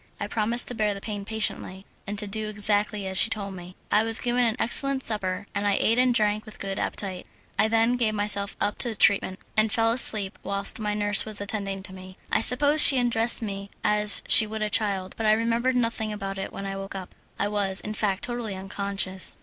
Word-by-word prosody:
I - - -3
promised 230 +2 +1
to - - -4
bear 215 -3 -1
the - - -7
pain 205 -1 -7
patiently, 205 -3 -3 0.2
and 205 +1 -5
to 210 - -4
do 215 +1 -4
exactly 210 0 0
as 190 0 +1
she - - +5
told 200 -3 -3
me. 180 0 -11 0.2
I 210 - +4
was 225 0 +2
given 245 0 0
an 225 -1 -1
excellent 270 +3 -1
supper, 195 -3 -2
and 205 0 -2
I 200 - +2
ate 230 +2 +1
and 255 0 +3
drank 215 -2 0
with 215 - -13
good 195 -1 -5
appetite. 190 -3 -4 0.3
I 215 - +4
then 225 +2 +1
gave 220 -3 0
myself 205 -1 -2
up 205 - -2
to 235 -3 +4
treatment, 195 -2 +2 0.2
and 215 0 +2
fell 225 +1 +1
asleep 215 -4 +4
whilst 200 +2 -1
my 210 -1 -3
nurse 205 -1 +6
was 215 -2 0
attending 200 -2 -4
to 190 -1 -6
me. 185 0 -12
I - - +2
suppose 285 +6 +3
she 275 - +10
undressed 240 -1 0
me 200 -1 -6
as 210 -2 +1
she 215 - +6
would 215 0 -5
a 210 - -3
child, 195 -3 0
but 225 - -2
I 215 - +5
remembered 230 +3 0
nothing 230 -3 -2
about 195 -2 -6
it 195 - -6
when 195 - -8
I 195 0 -5
woke 195 0 -7
up 185 -2 -8 0.2
I 200 - -1
was, 200 -2 -1
in 215 - -4
fact, 200 -3 -2
totally 240 -5 -5
unconscious. 195 0 -2
210 Hz, 220 wpm, -24 LUFS, 195-225 Hz, 0.3 s, she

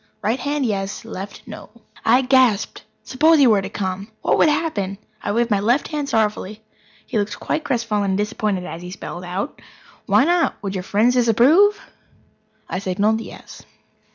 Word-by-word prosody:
Right 230 +5 0
hand, 290 -1 -1
yes; 200 -1 -3
left, 200 -3 -8
no." - - -10 0.3
I 245 +4 +4
gasped! 255 -5 +2 0.2
Suppose 315 +5 +3
he 280 - +6
were 215 -5 +4
to 195 - -6
come? 195 0 -4 0.2
What - - +2
would - - +5
happen? 210 - -1 0.2
I - - -2
waved 235 +2 0
my 205 - +3
left 240 +8 +1
hand 295 -3 -3
sorrowfully. 215 -1 -1 0.4
He 225 - -1
looked 205 0 -3
quite 315 - -2
crestfallen 230 -7 -1
and - - 0
disappointed 210 -3 -2
as 165 - -7
he 180 - -8
spelled 180 -1 -7
out: 185 +9 -5 0.5
"Why - - +4
not? 345 +1 +2
Would 195 -1 -3
your 190 - -3
friends 215 +6 +2
disapprove?" 260 - +4 0.9
I 185 - -3
signalled: 205 +4 0
"Yes." - - -11
220 Hz, 170 wpm, -21 LUFS, 200-260 Hz, 0.9 s, he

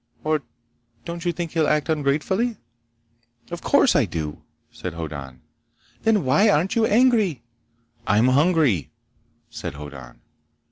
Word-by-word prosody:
Or 155 -1 +1 0.6
don't 170 +1 -6
you 175 - +2
think 170 -1 -5
he'll 160 -3 +1
act 150 0 +1
ungratefully?" 160 - 0 0.9
"Of 175 - -5
course 280 -2 +3
I 140 - +4
do!" 80 -5 -5 0.3
said 90 -3 -7
Hoddan. 70 -6 -7 0.6
"Then 215 -8 +2
why 195 +12 +4
aren't 180 +1 +2
you 225 -1 +3
angry?" 215 - +3 0.6
"I'm 110 +4 +4
hungry," 140 - +2 0.6
said - - -6
Hoddan. 65 -5 -10
150 Hz, 125 wpm, -23 LUFS, -, 0.9 s, I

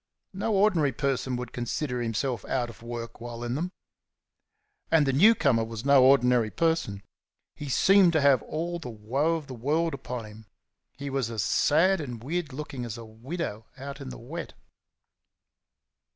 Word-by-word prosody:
No 200 +3 -1
ordinary 180 -9 +3
person 135 -1 -1
would 125 -1 -6
consider 125 +1 -2
himself 120 0 -2
out 120 -3 -1
of 115 - -18
work 115 0 -7
while 120 0 -6
in 120 0 -2
them. 170 +7 -2 1.2
And 160 -3 +4
the 135 - +1
new 210 - +6
comer 125 - +2
was 115 +1 -6
no 140 -2 +6
ordinary 125 -4 +4
person. 160 -11 0 0.5
He 145 - -7
seemed 190 +5 +5
to 155 - +3
have 140 -4 +5
all 170 +2 -4
the 150 - -7
woe 130 +9 0
of 160 -2 -5
the 135 - -8
world 155 +7 0
upon 125 -4 -5
him; 105 0 -13 0.5
he 140 0 -5
was 135 -4 -1
as 110 -4 -2
sad 170 +5 +3
and 120 -6 -7
weird 160 +2 -2
looking 135 -2 -6
as 120 -1 -5
a 115 - -9
widow 110 0 -6
out 140 +1 -7
in 135 - -6
the - - -8
wet. 155 +8 -7
135 Hz, 170 wpm, -27 LUFS, 120-155 Hz, 1.2 s, new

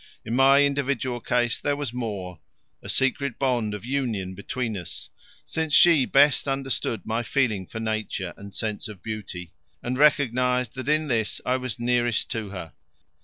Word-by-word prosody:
In 115 - -2
my 135 +2 +6
individual 140 -3 -1
case 120 0 0
there 145 0 +1
was 140 -5 -4
more, 100 -8 -4 0.4
a - - -9
secret 135 0 0
bond 120 -6 0
of 105 - -8
union 120 -9 -2
between 115 +4 -3
us, 85 -4 -6 0.3
since 160 -2 0
she 165 -6 +7
best 140 +1 +4
understood 135 -4 -2
my 115 +1 -1
feeling 115 -7 0
for 115 - -6
Nature 110 -5 -3
and 100 -1 -11
sense 110 -1 -2
of 105 -4 -11
beauty, 95 -6 -6 0.3
and 125 +2 -2
recognized 125 -4 +3
that 130 +1 -5
in 155 0 +2
this 115 -5 0
I 130 +1 +2
was 130 -4 -4
nearest 120 -1 +1
to 110 -4 -3
her. 90 -4 -7
120 Hz, 165 wpm, -25 LUFS, 110-135 Hz, 0.4 s, she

